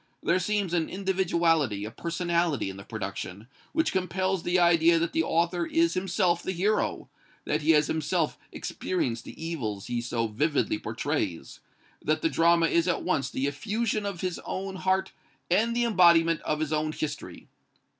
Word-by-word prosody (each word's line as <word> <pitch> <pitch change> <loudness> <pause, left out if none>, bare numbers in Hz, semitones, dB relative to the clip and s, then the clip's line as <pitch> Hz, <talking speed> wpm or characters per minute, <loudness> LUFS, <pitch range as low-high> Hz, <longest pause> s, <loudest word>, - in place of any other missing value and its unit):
"There 185 - +2
seems 200 -1 -1
an 165 -2 +1
individuality, 170 - +1
a 110 - -6
personality 170 - -1
in 95 - -11
the 100 - -9
production, 100 -1 -6 0.2
which 320 +1 +1
compels 185 0 0
the 175 +2 +1
idea 170 -1 +5
that 165 0 -1
the 160 - +2
author 170 +1 0
is 165 0 +2
himself 185 -1 +1
the 190 - -3
hero, 205 +5 0 0.4
that 150 +1 0
he 150 - -2
has 150 -1 +4
himself 160 +1 -1
experienced 125 -11 -3
the - - -11
evils 125 -12 -4
he 120 -1 -2
so 120 -1 -1
vividly 150 - 0
portrays, - - -3 0.4
that - - 0
the 325 - +3
drama 170 - +4
is 170 +1 +2
at 180 - 0
once 140 - 0
the 130 - -2
effusion 210 +8 -1
of 195 -4 -5
his 185 -2 -3
own 190 0 -4
heart 190 +1 0 0.4
and 225 +6 +3
the 240 - +2
embodiment 170 -6 +5
of 155 0 -2
his 155 0 -1
own 155 0 0
history. 155 - -5
170 Hz, 165 wpm, -27 LUFS, 150-185 Hz, 0.4 s, idea